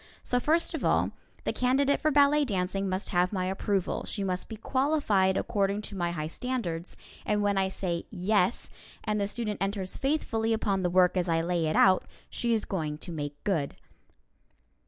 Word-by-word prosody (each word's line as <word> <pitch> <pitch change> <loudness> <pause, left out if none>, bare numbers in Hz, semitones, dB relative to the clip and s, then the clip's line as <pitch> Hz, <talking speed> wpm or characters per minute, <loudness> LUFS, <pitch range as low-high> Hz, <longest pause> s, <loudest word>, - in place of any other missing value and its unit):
So 245 - +2
first 320 +6 +1
of - - -3
all, - - +2 0.3
the - - -1
candidate 270 +3 +2
for 310 - +3
ballet 290 0 +5
dancing 195 -4 -1
must 185 +1 -2
have 180 -1 +2
my 185 -3 -1
approval, 190 0 -1
she 200 - -3
must 185 -1 -2
be 220 - -5
qualified 225 -7 +2
according 200 0 0
to 205 - -6
my 175 -2 0
high 160 -3 -3
standards, 175 -3 -3 0.3
and 210 -1 +1
when 205 0 +2
I 190 -1 +2
say 180 -3 -3
"Yes," 200 +1 0 0.3
and 210 -1 0
the 200 - +1
student 210 -1 -4
enters 195 -1 -2
faithfully 230 -6 0
upon 200 -3 0
the 180 - +1
work 180 +1 +4
as 180 -1 0
I 165 0 +2
lay 170 -2 0
it 155 - 0
out, 190 -1 +5 0.3
she 235 - -1
is 225 -2 +1
going 155 -6 -3
to 175 - -7
make 145 -3 -4
good. 165 -9 0
195 Hz, 185 wpm, -29 LUFS, 180-225 Hz, 0.3 s, ballet